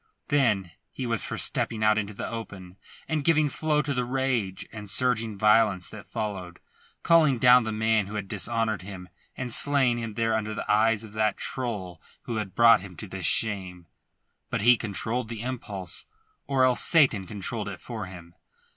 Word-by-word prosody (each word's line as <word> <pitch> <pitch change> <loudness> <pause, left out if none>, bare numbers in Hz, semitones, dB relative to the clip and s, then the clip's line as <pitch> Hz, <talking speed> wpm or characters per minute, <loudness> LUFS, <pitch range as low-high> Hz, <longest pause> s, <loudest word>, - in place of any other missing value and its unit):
Then 110 -11 +1 0.2
he 130 - -5
was 115 -2 +2
for - - -5
stepping 110 -1 0
out 110 0 +4
into 105 -1 -3
the - - -5
open, 95 -5 -8 0.3
and, 155 -2 -1
giving 155 -1 +3
flow 150 +1 0
to 145 -1 -2
the 125 -1 -1
rage 125 -7 -2
and 105 -2 -8
surging 115 -1 +1
violence 105 -3 +3
that 100 -3 -11
followed, 100 -5 -5 0.4
calling 155 -6 +4
down 125 0 +6
the 110 - -2
man 110 -1 +1
who 105 - -7
had 105 -2 -4
dishonoured 110 0 -1
him 90 -1 -9 0.3
and 125 -2 -2
slaying 135 -4 +4
him 115 -2 -6
there 115 -1 0
under 110 -1 -2
the - - -4
eyes 110 +1 +2
of 110 -2 -11
that 110 -1 0
trull 100 -10 -4 0.2
who 115 - -4
had 105 -3 -5
brought 115 -3 +6
him 95 -2 -11
to 105 - -7
this 95 -2 -2
shame. 95 -5 -1 0.6
But - - -2
he 120 +3 +6
controlled 110 +2 -3
the 115 -1 -6
impulse, 105 -8 -5 0.4
or 135 -2 +2
else 125 -1 +3
Satan 130 - +3
controlled 105 +1 -4
it 100 - -8
for 110 -5 -7
him. 85 -2 -12
110 Hz, 180 wpm, -26 LUFS, 100-125 Hz, 0.6 s, down